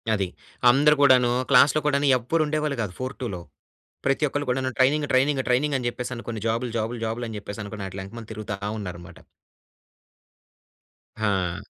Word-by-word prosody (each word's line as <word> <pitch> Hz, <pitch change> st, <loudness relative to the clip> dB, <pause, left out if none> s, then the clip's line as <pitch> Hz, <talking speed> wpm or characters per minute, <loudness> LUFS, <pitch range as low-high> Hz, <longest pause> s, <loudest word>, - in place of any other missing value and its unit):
అది. 100 Hz, -2 st, -1 dB, 0.4 s
అందరు 150 Hz, +3 st, +5 dB
గూడాను 130 Hz, -3 st, +5 dB, 0.2 s
క్లాస్‌లో 140 Hz, +3 st, +6 dB
కూడాను 145 Hz, -1 st, +2 dB
ఎవ్వరు 140 Hz, +7 st, 0 dB
ఉండేవాళ్ళు 150 Hz, -2 st, -1 dB
కాదు 100 Hz, -4 st, -4 dB
4-2లో 130 Hz, -8 st, -4 dB, 0.6 s
ప్రతి 135 Hz, +2 st, +2 dB
ఒక్కళ్ళు 145 Hz, +1 st, -2 dB
కూడాను 130 Hz, +1 st, 0 dB
ట్రైనింగ్ 145 Hz, +3 st, +3 dB
ట్రైనింగ్ 135 Hz, +1 st, +3 dB
ట్రైనింగ్ 140 Hz, +4 st, +2 dB
అని 125 Hz, -, -5 dB
జెప్పేసనుకొని, 120 Hz, -2 st, -4 dB
జాబుల్ 115 Hz, +2 st, -1 dB
జాబుల్ 115 Hz, +2 st, -2 dB
జాబుల్ 115 Hz, +2 st, -3 dB
అని 110 Hz, -, -7 dB
జెప్పేసనుకొని, 100 Hz, 0 st, -7 dB
అట్లా 95 Hz, +1 st, -7 dB
ఎనకమాల 115 Hz, +3 st, -10 dB
తిరుగుతా 105 Hz, -1 st, -5 dB, 0.2 s
ఉన్నారనమాట. 90 Hz, -4 st, -8 dB, 2.0 s
హా! 95 Hz, -4 st, 0 dB
120 Hz, 140 wpm, -25 LUFS, 105-140 Hz, 2.0 s, క్లాస్‌లో